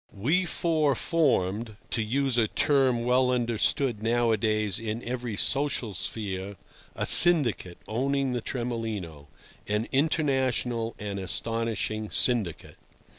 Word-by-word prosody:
We 160 - +1
four 155 -5 0
formed 115 - -1 0.2
(to 115 - -1
use 130 +4 -1
a 115 -2 +2
term 130 -3 +1
well 125 +1 +2
understood 120 -1 -1
nowadays 110 -3 0
in 115 +1 -5
every 120 -2 -5
social 135 -2 -1
sphere) 100 0 -5 0.4
a - - -3
"syndicate" 140 - +7
owning 135 +3 -1
the 120 - -3
Tremolino: 110 - -5 0.4
an 105 +2 -2
international 130 -6 -1
and 100 -1 -6
astonishing 110 +3 -3
syndicate. 110 -10 +1
115 Hz, 110 wpm, -26 LUFS, 105-130 Hz, 0.4 s, syndicate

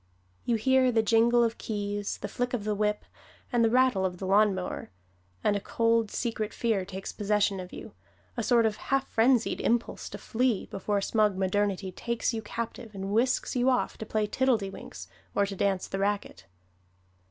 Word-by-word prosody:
You 240 - +2
hear 260 +3 +3
the 225 -2 +2
jingle 235 +2 +4
of 230 0 -1
keys, 205 -1 -3
the - - -5
flick 245 0 -2
of 220 - -4
the 210 0 0
whip 210 0 -1 0.5
and 240 -1 +4
the 225 - +4
rattle 250 -5 +3
of 180 -1 -1
the 190 - -5
lawnmower; 195 -1 +1 0.5
and 205 - +3
a - - 0
cold, 230 +1 +1
secret 220 -2 -3
fear 220 -5 0
takes 190 0 -6
possession 205 -1 +1
of 180 0 -8
you - - -9 0.4
a - - -1
sort 235 -3 +3
of 215 -1 0
half 270 0 -1
frenzied 235 +1 +2
impulse 235 0 -1
to - - -7
flee, 245 -3 0
before 200 +1 -2
smug 210 -2 +2
modernity 195 0 0
takes 235 +5 -2
you 225 - -2
captive 225 0 -6
and 195 0 -4
whisks 245 +5 +1
you 250 +1 +3
off 255 - +1
to 220 - -5
play 215 -1 0
tiddledywinks 205 - -1 0.3
or 200 - +3
to 200 0 -5
dance 195 -1 0
the 195 - -4
racquet. 200 - -2
215 Hz, 180 wpm, -28 LUFS, 200-235 Hz, 0.5 s, jingle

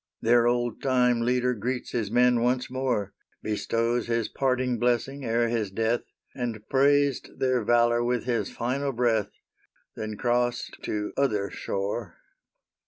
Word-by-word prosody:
Their 120 +1 +4
old 120 -1 0
time 125 -3 +2
leader 125 +1 +1
greets 125 +3 -3
his 110 -5 -1
men 125 +1 +4
once 125 +1 0
more, 125 -6 -1 0.3
Bestows 115 +2 -1
his 115 -2 0
parting 130 -2 0
blessing 125 +4 0
ere 115 0 +1
his 115 -3 -1
death, 115 +4 0 0.3
And 115 -4 -4
praised 140 0 +3
their 130 -3 +1
valor 120 +1 +3
with 120 -1 0
his 120 -1 -1
final 135 +3 -2
breath, 115 -3 +1 0.7
Then 110 -1 -5
crossed 120 +1 0
to 105 -1 -3
other 105 -8 +1
shore. 100 0 -4
120 Hz, 135 wpm, -26 LUFS, 115-125 Hz, 0.7 s, Their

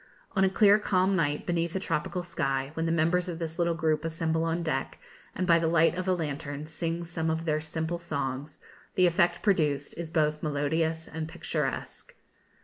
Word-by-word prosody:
On 190 - +4
a 190 - +5
clear 205 +1 +5
calm 190 -1 +2
night, 150 -4 0
beneath 170 0 -1
a - - +1
tropical 170 0 -2
sky, 135 -5 -1
when 165 +1 -1
the - - +1
members 170 +2 +2
of 170 - -4
this 165 0 -5
little 170 -1 +2
group 155 -2 +1
assemble 165 0 -1
on 165 +1 -1
deck, 155 -5 -2 0.4
and, 185 - 0
by 170 -1 +5
the 165 - +1
light 165 0 +4
of 185 +1 -4
a 185 - +4
lantern, 145 -2 -4
sing 165 +1 -3
some 165 -1 -2
of 160 +1 -1
their 155 -1 +1
simple 160 +2 -3
songs, 140 -3 -4 0.4
the 185 - +5
effect 175 0 +2
produced 150 -8 +1
is 170 -2 -4
both 150 -2 +1
melodious 160 +2 0
and 160 0 -5
picturesque. 155 -4 -4
165 Hz, 190 wpm, -28 LUFS, 155-170 Hz, 0.4 s, a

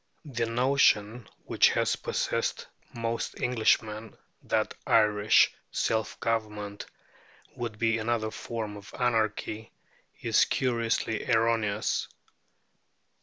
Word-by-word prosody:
The 120 -5 -2
notion 120 -3 +2 0.2
which - - +4
has - - +1
possessed - - -2 0.3
most 115 0 -3
Englishmen, 110 -2 0 0.2
that - - 0
Irish 105 -1 +4 0.2
self 110 -1 -1
government 105 -3 -3 0.7
would 115 -3 -5
be 115 0 +1
another 110 -1 -1 0.2
name 105 -3 -4
for 100 - -13
anarchy, 110 -2 -1 0.5
is - - +3
curiously 115 -3 -1
erroneous. 110 -2 +1
110 Hz, 90 wpm, -28 LUFS, 105-115 Hz, 0.7 s, which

